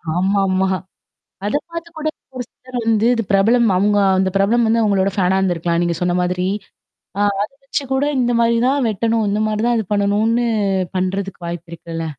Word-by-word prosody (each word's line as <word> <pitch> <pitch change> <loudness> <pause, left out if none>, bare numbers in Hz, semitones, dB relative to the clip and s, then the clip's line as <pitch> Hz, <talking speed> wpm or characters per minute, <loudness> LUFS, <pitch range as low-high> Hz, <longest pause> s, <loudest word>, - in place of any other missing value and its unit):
ஆமாமா. 190 0 +1 0.8
அத 210 - -2 0.2
பார்த்து 335 0 -6
கூட. 310 - -1 0.3
ஒரு 245 - -3
சிலர் 255 -1 -8
வந்து 225 -1 +2
இது 230 - -1
பிரபலம். 225 +4 +4
அவுங்க 205 +2 +2 0.2
அந்த 190 0 +2
பிரபலம் 225 +4 +3
வந்து 230 +1 +2
அவங்களோட 200 -2 +2
ஃபேனா 190 -1 +2
இருந்திருக்கலாம். 170 -2 0
நீங்க 170 -1 0
சொன்ன 175 0 +1
மாதிரி. 180 0 -1 0.7
ஆ - - 0 0.2
அத 210 - -3
வச்சு 275 +1 -2
கூட 270 +2 +1 0.2
இந்த 245 -1 +1
மாரி 235 0 +3
தான் 275 -1 +1
வெட்டணும். 225 +1 0
இந்த 210 +1 0
மாரி 215 0 -1
தான் 240 -1 +2
இது 220 - -3
பண்ணணும்னு 215 +4 +1 0.5
பண்றதுக்கு 185 0 -3
வாய்ப்பு 170 0 -6
இருக்குல்ல. 165 -1 -6
205 Hz, 170 wpm, -19 LUFS, 185-230 Hz, 0.8 s, பிரபலம்